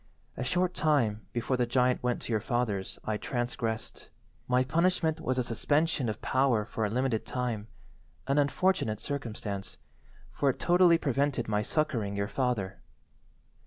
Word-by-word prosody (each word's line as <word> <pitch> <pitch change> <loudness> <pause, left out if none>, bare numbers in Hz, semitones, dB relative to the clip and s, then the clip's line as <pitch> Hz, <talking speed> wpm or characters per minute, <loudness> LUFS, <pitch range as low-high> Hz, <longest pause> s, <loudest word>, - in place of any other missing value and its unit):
A - - -3
short 180 +7 +1
time 120 -9 +1
before 120 +2 -1
the 125 -1 +1
giant 125 +1 +2
went 125 -1 -1
to 120 - -3
your 110 - +2
father's 110 -4 -1
I 110 -1 0
transgressed. 115 -2 -3 0.4
My 125 0 +3
punishment 160 +2 +1
was 130 -4 -1
a 125 - +2
suspension 145 +3 +1
of 105 - -5
power 130 -5 +2
for 110 0 -3
a 105 - +1
limited 125 0 0
time—an 125 +3 -5
unfortunate 145 - +1
circumstance—for 115 +1 -5
it 130 - -1
totally 175 -1 +5
prevented 140 -4 0
my 105 -1 +1
succouring 110 -6 -1
your 100 0 -1
father. 110 -6 -2
125 Hz, 140 wpm, -29 LUFS, 110-140 Hz, 0.4 s, totally